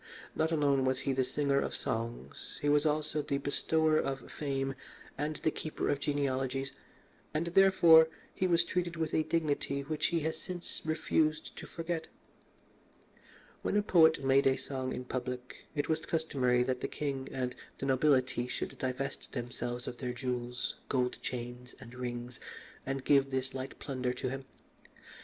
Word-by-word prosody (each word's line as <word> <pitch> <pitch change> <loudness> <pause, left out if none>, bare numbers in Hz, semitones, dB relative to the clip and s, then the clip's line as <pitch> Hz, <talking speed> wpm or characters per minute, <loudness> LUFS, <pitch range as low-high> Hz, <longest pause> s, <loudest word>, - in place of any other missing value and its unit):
Not 160 +1 +1
alone 140 -4 +3
was 130 0 +1
he 135 - 0
the 130 0 +2
singer 140 +1 +1
of - - -1
songs, 115 - -4
he 145 - +1
was 150 +1 +4
also 155 0 +1
the 140 -1 -1
bestower 155 +2 +2
of 135 0 -3
fame 135 -2 -1 0.4
and 150 +2 -2
the 155 - 0
keeper 155 - -3
of 145 - +1
genealogies, 135 -2 -1 0.6
and, 155 +2 +1
therefore, 175 -4 +8 0.2
he 185 - +1
was 170 -1 +4
treated 175 -1 -1
with 160 -1 -2
a - - +4
dignity 145 -4 0
which 150 +2 0
he 170 -2 0
has 160 +1 -2
since 180 -2 -5
refused 155 0 0
to - - -8
forget. 165 -1 -3 1.5
When - - +1
a 205 - +3
poet 160 -6 +5
made 135 +1 +5
a 135 0 +3
song 130 -2 -3
in 125 - -4
public, 125 0 -5
it 145 -1 0
was 160 0 0
customary 130 -7 +2
that 125 0 -1
the - - 0
king 135 -2 -3
and 125 -1 -2 0.2
the - - -4
nobility 130 -2 +3
should - - -4
divest 130 +2 -3
themselves 120 0 -4
of 120 - -6
their 125 -2 -2
jewels, 125 0 -3
gold 125 -2 0
chains, 125 0 -5
and 125 -2 -11
rings, 120 -1 -5 0.5
and 135 -1 -2
give 140 -1 +5
this 130 0 -2
light 130 +1 -5
plunder 130 -3 -2
to 125 0 -3
him. 135 +1 -5
135 Hz, 165 wpm, -32 LUFS, 125-155 Hz, 1.5 s, therefore